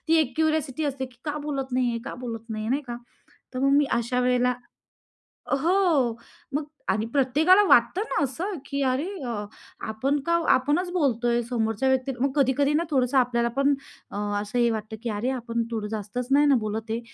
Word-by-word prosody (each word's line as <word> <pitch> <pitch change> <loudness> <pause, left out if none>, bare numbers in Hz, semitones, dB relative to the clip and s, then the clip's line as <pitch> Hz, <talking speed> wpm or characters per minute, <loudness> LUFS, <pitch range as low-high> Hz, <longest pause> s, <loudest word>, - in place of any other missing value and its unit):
ती 325 - +5
एक 270 -5 -1
क्युरिओसिटी 315 -2 0
असते 270 -2 -2
की 250 -1 -20
"का 300 -1 -2
बोलत 270 -3 -3
नाही 250 -1 +2
आहे? 230 - -2
का 275 - -5
बोलत 230 -2 -5
नाही 215 -1 -3
आहे?" 225 - -2
नाही 280 +3 +1
का? 240 -3 -6 0.6
तर - - -2
मग 275 +1 +3
मी 290 - +5
अशा 240 +2 0
वेळेला 250 0 +2 1.1
हो, 335 +6 +2 0.8
मग 295 - 0 0.3
आणि 210 +3 +1
प्रत्येकाला 300 +9 +5
वाटतं 240 +10 +4
ना, - - 0
असं 330 - -3
की 280 0 -3
अरे 265 +5 0 0.8
आपण 265 +7 0
का 335 - 0 0.2
आपणच 290 +8 +1
बोलतोय 240 -8 +1
समोरच्या 225 +1 0
व्यक्ती 265 +1 +1
मग 275 +2 +1
कधी-कधी 280 +1 +2
ना 315 +3 +2
थोडंसं 260 -1 +2
आपल्याला 235 -2 +2
पण 275 +1 +4 0.4
अ, - - -5 0.2
असं 210 +4 -3
हे 240 -1 +4
वाटतं 220 0 -4
की 240 - -2
"अरे 215 +4 -1
आपण 235 -1 -2
थोडं 220 -2 -2
जास्तच 215 +3 -4
नाही 290 +2 +5
ना 280 - +5
बोलत 220 +1 -4
आहे?" 225 - -1
255 Hz, 190 wpm, -25 LUFS, 235-285 Hz, 1.1 s, ती